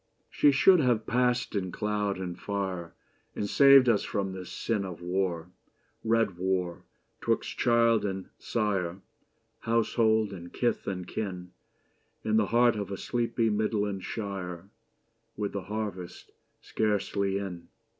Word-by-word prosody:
She 145 - +5
should 180 +7 +6
have 120 -6 +2
passed 125 0 +1
in 95 -3 -2
cloud 105 -1 -1
and 90 -2 -4
fire 95 -3 -4 0.4
And 100 - -2
saved 135 +2 +7
us 110 -4 +4
from 100 -2 -2
this 95 -2 -8
sin 110 -4 -1
Of 90 -4 -6
war 90 -1 -2 0.3
— - - -42
red 115 0 +3
Avar 90 -1 -2 0.2
— - - -45
'twixt - - -1
child 115 -2 +4
and 95 -2 -3
sire, 95 -5 -1 0.6
Household 110 -2 +2
and 85 -2 -9
kith 120 - -1
and 90 -2 -3
kin, 90 -4 -5 0.7
In 110 0 +2
the 105 -2 +3
heart 120 0 +4
of 100 -2 -4
a 100 - -4
sleepy 115 -1 0
Midland 105 -2 -1
shire, 95 -3 -5 0.7
With 105 -1 -2
the 100 -2 -4
harvest 100 -4 -5 0.3
scarcely 100 -1 0
in. 95 -4 -6
100 Hz, 140 wpm, -28 LUFS, 95-115 Hz, 0.7 s, saved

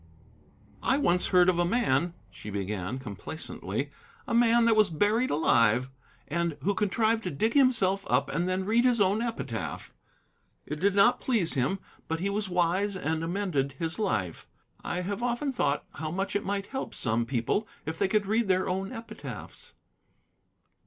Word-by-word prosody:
"I 265 - +2
once 180 -11 +2
heard 180 -1 +5
of 180 -2 +3
a - - +4
man," 175 - +1 0.2
she 105 - -9
began 100 +2 -3
complacently, 130 +5 -5 0.4
"a 240 - -2
man 235 0 +5
that 230 -1 +4
was 215 -2 +4
buried 210 +9 +1
alive, 125 -4 +3 0.4
and 170 -1 -1
who 200 - +2
contrived 220 +3 +1
to - - 0
dig 215 +9 0
himself 215 -9 +3
up - - +2
and 175 +2 -1
then 185 +1 -1
read 230 +4 +3
his 250 -2 +3
own 200 +2 +3
epitaph. 135 - -4 0.7
It 150 +1 -5
did 200 +3 +2
not 205 +5 +5
please 220 -10 +2
him, 135 +8 0 0.3
but 160 0 -2
he 200 +3 -1
was 205 -1 -2
wise 180 +3 +1
and 160 -2 -2
amended 165 -7 -1
his 165 +5 -3
life. 100 - -2 0.4
I 180 - -2
have 200 +4 -3
often 245 +4 -1
thought 145 - 0
how 155 0 -4
much 195 +5 -2
it 205 - 0
might 200 0 -2
help 265 - -4
some 115 0 0
people 130 - 0 0.2
if 160 +1 -4
they - - +3
could 210 +1 +1
read 220 +2 +1
their 185 0 +2
own 190 +1 -2
epitaphs." 230 0 -9
185 Hz, 170 wpm, -28 LUFS, 155-215 Hz, 0.7 s, heard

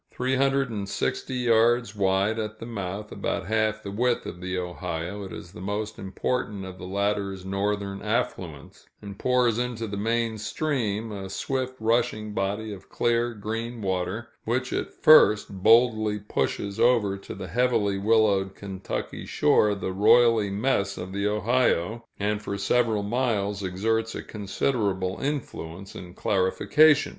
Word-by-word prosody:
Three 130 +1 -1
hundred 135 -1 +2
and 100 -3 -4
sixty 130 - -2
yards 120 -2 +3
wide 100 +2 +1
at 110 0 -4
the 115 - -8
mouth, 105 -2 -5
about 100 - -2
half 110 +1 0
the 100 - -5
width 120 +4 0
of 90 - -7
the 95 0 -3
Ohio, 90 +1 -4
it 95 - -9
is 85 - -9
the 90 - -10
most 105 +2 -3
important 100 0 -2
of 95 -1 -9
the 90 - -7
latter's 100 -1 -1
northern 100 0 -2
affluents, 95 - -3
and 100 -1 -9
pours 125 -3 +2
into 120 -2 -2
the 100 -2 -5
main 115 +1 0
stream 110 -3 -2
a 95 -2 -6
swift 130 +5 -2
rushing 110 -1 0
body 105 +2 -2
of 95 -1 -12
clear, 120 0 +1
green 115 +2 -4
water, 95 +4 -2
which 125 +3 -1
at - - -2
first 105 -10 +6
boldly 110 -1 +4
pushes 100 -1 -2
over 115 -5 +3
to 100 - -9
the - - -6
heavily 115 -5 +1
willowed 100 -2 +2
Kentucky 95 -1 -5
shore 105 -1 +3
the 95 -1 -4
roily 110 +1 +5
mess 100 -1 0
of 95 +1 -6
the 100 +1 0
Ohio, 110 -1 +1
and 105 +1 -1
for 100 -1 -4
several 115 -2 +1
miles 105 -3 0
exerts 110 +4 -1
a - - -5
considerable 100 -3 -1
influence 100 - -4
in 90 0 -10
clarification. 145 +10 +3
105 Hz, 150 wpm, -26 LUFS, 100-115 Hz, -, first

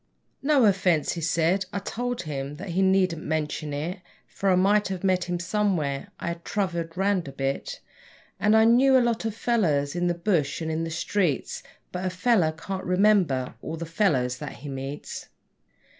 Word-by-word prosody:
'No 285 -1 +3
erfence,' 185 -6 +3
he 170 - -4
said. 165 +4 +1
I - - -3
told 245 +3 -3
him 140 -2 -4
that 190 +5 -8
he 180 +3 0
needn't 190 -4 +2
mention 155 -1 -2
it, 160 +7 -3 0.3
For 195 - -2
I 185 - +5
might 205 +3 +3
have 190 -1 -5
met 185 -2 +2
him 175 -1 -2
somewhere; 170 -7 -1
I - - -3
had 170 0 -6
travelled 170 -4 -2
round 195 -3 +1
a - - -6
bit, 135 0 -3 0.6
And 210 +2 +4
I 220 - +6
knew 260 +3 +6
a 245 -2 +3
lot 230 -1 -1
of 220 -2 -2
fellows 170 -12 +1
in 175 0 0
the 175 - +1
bush 170 -5 0
and 160 -1 -3
in 160 +1 -1
the - - -4
streets 165 -1 -1 0.3
But 180 0 -4
a - - +1
fellow 185 -2 +2
can't 190 +4 -6
remember 180 -9 +2
all 165 - -5
the 170 - -5
fellows 145 - +1
that - - -6
he 145 +3 -9
meets. 135 +2 -6
180 Hz, 190 wpm, -26 LUFS, 155-200 Hz, 0.6 s, I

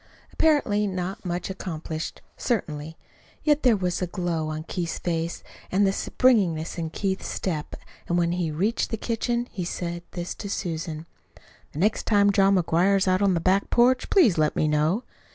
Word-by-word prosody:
Apparently 215 -10 +2
not 185 0 -4
much 180 +1 -3
accomplished, 160 -4 -5
certainly; 160 - -2 0.5
yet 300 -1 +3
there 240 -5 +4
was 180 -2 -1
the 180 - -1
glow 175 -4 -2
on 155 0 -4
Keith's 170 0 -3
face 170 -1 -2 0.3
and 200 +2 +3
the 195 - +2
springiness 185 -11 +1
in 165 -1 -2
Keith's 190 +3 -2
step; 155 -5 -3 0.3
and 175 - +1
when 170 -1 +2
he 175 -2 -1
reached 195 +10 0
the 225 - -2
kitchen, 235 +2 -1
he 185 - -4
said 175 0 -4
this 175 0 -4
to 200 - -7
Susan: 165 -4 -4 0.7
"The - - -9
next 210 +7 +1
time 205 -2 +4
John 195 0 +4
McGuire 180 +2 +3
is 190 - 0
on 185 0 +3
the - - +1
back 190 +4 +2
porch, 250 +2 +3
please 240 - +4
let 155 -1 +2
me 155 - +2
know." 155 +9 +1
185 Hz, 170 wpm, -25 LUFS, 165-205 Hz, 0.7 s, there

